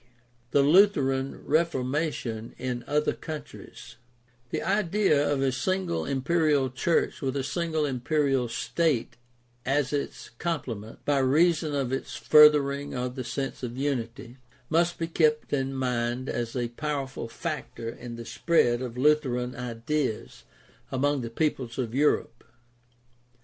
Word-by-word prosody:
THE 140 - +4
LUTHERAN 140 -6 +3
REFORMATION 140 -6 -1
IN 125 -1 -3
OTHER 150 +1 +1
COUNTRIES 150 -6 -9 0.5
The - - -2
idea 190 -6 +2
of 135 -2 +1
a 135 - +2
single 130 - -1
imperial 140 -1 +1
church 160 +6 0
with 135 0 -1
a 135 - -1
single 160 +1 -1
imperial 135 -1 +1
state 145 +2 0 0.5
as 140 +1 0
its 145 - -4
complement, 120 -11 -4
by 145 -1 +2
reason 155 +3 +3
of 135 -2 -1
its 135 - -4
furthering 145 -2 +5
of 125 0 -2
the 130 -1 -5
sense 135 +3 -4
of 125 -1 -5
unity, 125 -3 -3 0.3
must 170 +2 +2
be 165 - -1
kept 155 -3 +1
in 135 -1 0
mind 125 -1 -1
as 120 0 -3
a 120 -2 -1
powerful 135 -1 -4
factor 150 -3 -5
in 120 +1 -7
the 115 0 -8
spread 120 -1 +2
of 125 -2 -5
Lutheran 130 -3 +2
ideas 125 +1 -3 0.5
among 145 +1 +1
the 115 - -4
peoples 125 -2 -2
of 120 -4 -2
Europe. 135 -4 +1
135 Hz, 130 wpm, -27 LUFS, 125-150 Hz, 0.5 s, furthering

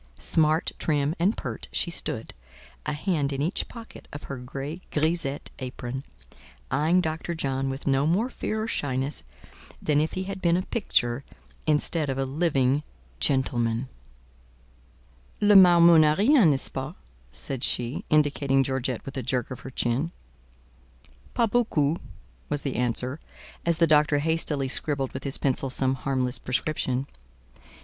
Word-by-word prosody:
Smart, 155 0 +2
trim 145 -1 +1
and 190 +6 +2
pert, - - -5
she - - -1
stood, - - -3 0.5
a 150 - 0
hand 150 -2 -1
in 135 - -3
each 160 +7 -1
pocket 230 -1 -11
of 145 - -8
her 140 - -6
gay 140 +6 -6
grisette 155 -2 -1
apron, 130 0 -5 0.7
eyeing 160 +6 +3
Dr. 160 +1 -3
John 135 -3 -1
with 135 +1 -5
no 140 +1 +2
more 195 +9 +2
fear 220 -4 -3
or - - -3
shyness 135 - -2 0.6
than 150 -1 +2
if 155 - -1
he 185 - -2
had 190 0 -6
been 170 0 +3
a 185 - -1
picture 130 - 0 0.4
instead 155 0 +2
of 135 - -1
a 135 - 0
living 140 -2 +1 0.4
gentleman. 120 - +1 1.5
"Le 205 0 +5
marmot 170 -3 +8
n'a 150 0 +4
rien, 225 - +5
nest 135 -3 0
ce - - -5
pas?" 135 0 -5 0.4
said 70 - -2
she, 120 0 0
indicating 140 -3 +3
Georgette 130 -2 -2
with 135 +1 -7
a - - -1
jerk 125 +1 -2
of 130 - -6
her 130 - -8
chin. 130 +5 -1 1.2
"Pas 235 - +4
beaucoup," 170 -10 +1 0.5
was 145 -1 -2
the 135 - -2
answer, 125 +3 -1 0.5
as 170 -1 +3
the 165 - +5
doctor 150 -1 +4
hastily 150 -2 0
scribbled 135 0 -1
with 130 - -6
his 140 - +4
pencil 135 0 0
some 130 0 +1
harmless 130 -1 -1
prescription. 130 0 -1
145 Hz, 150 wpm, -26 LUFS, 130-165 Hz, 1.5 s, marmot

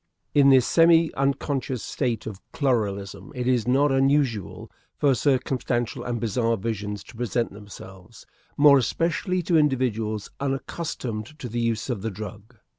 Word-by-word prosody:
In 140 -1 +6
this 130 -2 +6
semi 165 -1 +4
unconscious 135 -2 -1
state 120 -6 -2
of 105 -4 -7
chloralism 105 -8 -1
it 125 -1 -3
is 125 -3 +1
not 140 +3 +3
unusual 135 - 0 0.3
for 140 -2 +3
circumstantial 125 -3 -1
and 120 -1 -3
bizarre 115 +1 0
visions 105 -1 -4
to - - -15
present 120 -1 -2
themselves 95 -3 -12 0.3
more 145 -1 +7
especially 175 - -1
to 165 -1 +3
individuals 115 -7 0
unaccustomed 135 -3 -4
to 135 - -6
the 120 +1 -3
use 115 -1 -1
of 120 -7 -3
the 115 - -2
drug. 105 +3 -9
125 Hz, 140 wpm, -25 LUFS, 110-140 Hz, 0.3 s, more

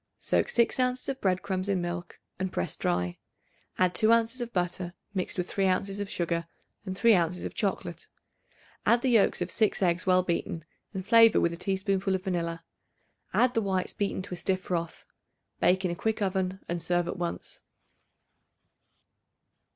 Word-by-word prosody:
Soak - - +1
6 235 +2 +2
ounces 255 0 0
of 270 -1 -3
bread 185 -1 +1
crumbs 190 -1 -2
in 195 -2 +2
milk 175 0 -5 0.2
and 190 -1 -2
press 85 - -2
dry; 90 0 -1 0.6
add 180 -1 +3
2 220 +4 +3
ounces 230 +2 +3
of 240 -1 -4
butter 180 -1 -2 0.2
mixed 185 -1 -2
with 180 -1 -1
3 195 -1 +1
ounces 195 +2 0
of 205 -1 -3
sugar 170 -1 -1 0.4
and 185 0 -4
3 230 +2 +6
ounces 175 -1 +1
of - - -4
chocolate; 200 -3 -3 0.8
add 235 0 +3
the 260 - +2
yolks 225 -4 +4
of - - -5
6 215 -2 +2
eggs 175 +1 +1
well 185 0 +5
beaten, 170 -2 -2 0.3
and 190 -2 -5
flavor 230 0 +7
with 170 - +1
a - - -4
teaspoonful 190 +1 0
of 185 - -4
vanilla; 170 -3 -2 0.7
add 250 0 +3
the 225 - +2
whites 190 -3 -1
beaten 200 -2 -2
to 190 - -7
a - - -4
stiff 185 +1 0
froth. 170 -2 -3 0.5
Bake 185 +2 +3
in 180 - +1
a - - -3
quick 220 +5 -1
oven 190 -1 -1
and 175 0 -2
serve 175 0 0
at - - -4
once. 175 -1 -4
185 Hz, 180 wpm, -28 LUFS, 175-205 Hz, 0.8 s, flavor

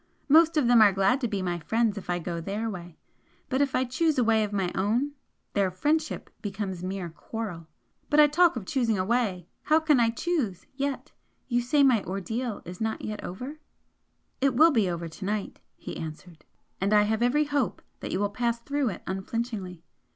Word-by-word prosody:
Most 320 +2 +6
of 295 - +3
them 240 -2 +6
are 210 -2 +7
glad 195 +8 +2
to 245 - +1
be 200 -4 -2
my 175 -1 -2
friends 220 +6 +1
if 200 - -8
I 175 - +1
go 170 -1 -4
THEIR 210 +6 -3
way 175 -3 -9 0.5
but 260 +1 +1
if 280 -2 +1
I 260 - +2
choose 300 +5 +1
a 250 - +4
way 220 -1 +3
of 210 - -3
my 190 -3 -1
own 225 +9 0 0.4
their 200 -2 +2
'friendship' 305 - -1
becomes 195 -3 -4
mere 185 -2 -4
quarrel. 175 -3 -6 0.4
But 300 - +4
I 300 - +10
talk 335 +3 +4
of 225 -6 -5
choosing 230 -2 +1
a 185 - 0
way! 205 -6 0 0.2
How 310 +1 +5
can 310 -4 +3
I 230 -1 +4
choose 235 - -2
yet? 275 0 -3 0.4
You 240 -1 +1
say 280 +4 +3
my 250 -6 +4
ordeal 215 +5 -4
is 180 +3 -9
not 220 0 -1 0.2
over?" 255 +12 -6 0.8
"It 270 -2 +2
will 320 +6 +7
be 220 -9 +2
over 170 -1 -3
to 165 +4 -10
night," 210 0 -3 0.2
he - - -8
answered 160 0 -8 0.4
"And 200 +2 +3
I 210 - +6
have 220 +2 0
every 255 +5 +3
hope 285 -5 -1 0.2
that - - -5
you 185 - -1
will 205 0 0
pass 235 +2 0
through 280 +1 -1
it 185 - -7
unflinchingly. 190 -2 -4
220 Hz, 200 wpm, -27 LUFS, 190-260 Hz, 0.8 s, I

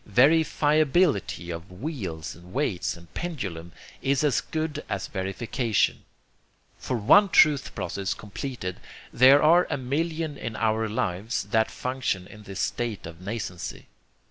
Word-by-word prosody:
VerifiABILITY 150 - +3
of 85 +2 -7
wheels 90 - -5
and 85 +1 -15
weights 110 -13 -1
and 85 0 -17
pendulum 95 - -5 0.3
is 135 0 +1
as 145 -5 +2
good 155 -1 -3
as 95 - -2
verification. 105 +4 -1 0.8
For 125 - -2
one 195 - +6
truth 150 -5 +4
process 100 0 -3
completed 105 -3 -6 0.3
there 135 +3 +7
are 170 +3 +5
a - - -1
million 155 +3 -2
in 115 - -5
our 110 0 0
lives 105 +1 -2
that 110 -1 +3
function 125 -8 -2
in 105 +2 -13
this 95 -1 -5
state 115 -4 -2
of 80 0 -9
nascency. 95 -2 -5
115 Hz, 130 wpm, -26 LUFS, 95-145 Hz, 0.8 s, there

